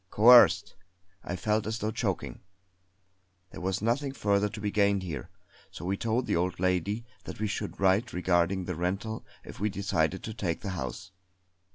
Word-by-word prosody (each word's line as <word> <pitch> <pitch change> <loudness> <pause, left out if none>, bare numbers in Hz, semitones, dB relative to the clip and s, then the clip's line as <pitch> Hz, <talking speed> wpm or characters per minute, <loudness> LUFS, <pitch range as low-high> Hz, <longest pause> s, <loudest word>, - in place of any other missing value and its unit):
Coerced! 105 -3 +7 0.5
I 90 - -4
felt 105 +4 0
as 110 +1 -2
though 110 0 -2
choking! 110 -5 -3 1.1
There - - -9
was 95 +2 -2
nothing 135 +5 0
further 100 -4 +1
to 110 - -8
be 105 -1 -2
gained 100 -2 +2
here; 75 -8 -5 0.4
so 85 - -9
we 95 +2 0
told 115 +4 -1
the - - 0
old 90 +1 -1
lady 95 +5 0 0.2
that - - -8
we 110 - 0
should 105 0 -4
write 100 +5 +2
regarding 90 +1 +1
the 90 - -3
rental 95 +6 -3 0.2
if - - -11
we 105 +2 +1
decided 95 -3 -1
to 110 - -5
take 90 -6 -3
the 100 - -4
house. 80 0 -5
100 Hz, 175 wpm, -29 LUFS, 90-110 Hz, 1.1 s, Coerced